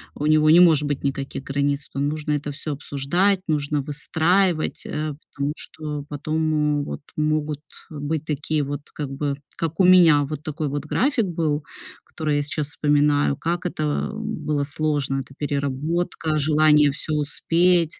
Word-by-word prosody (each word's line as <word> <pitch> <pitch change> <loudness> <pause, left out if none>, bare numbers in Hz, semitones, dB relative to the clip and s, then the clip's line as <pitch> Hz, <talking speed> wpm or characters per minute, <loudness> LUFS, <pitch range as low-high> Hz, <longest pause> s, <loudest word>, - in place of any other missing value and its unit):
у 150 - -3
него 155 0 +4
не 165 +3 +8
может 160 -5 +6
быть 145 -2 -2
никаких 135 -1 -3
границ. 140 +1 -1
То - - -6
нужно 150 +2 -1
это 145 0 -1
всё 145 +1 -5
обсуждать, 160 +8 +1
нужно 150 -2 0
выстраивать, 160 +4 0
э, 150 0 -3 0.2
потому 140 +1 -2
что 150 -3 -6
потом 150 0 0
вот - - -6
могут 150 -1 -1 0.3
быть 150 +1 -3
такие 150 0 -1
вот, 145 +1 -4
как 145 -3 -4
бы, 140 +1 -2 0.2
как 165 -1 -3
у 190 - +6
меня 170 -5 +7
вот 150 +1 -5
такой 155 0 -3
вот 145 +1 -3
график 255 - +1
был, 160 -4 -1 0.4
который 155 -3 -2
я - - +2
сейчас 150 0 -2
вспоминаю, 145 -1 +2
как 170 +2 -2
это 155 -4 -1
было 155 -10 -2
сложно, 145 -2 -1
это 135 0 -8
переработка, 150 +3 -1
желание 150 0 +4
всё 155 +2 -5
успеть. 165 +3 +2
150 Hz, 155 wpm, -23 LUFS, 145-160 Hz, 0.4 s, не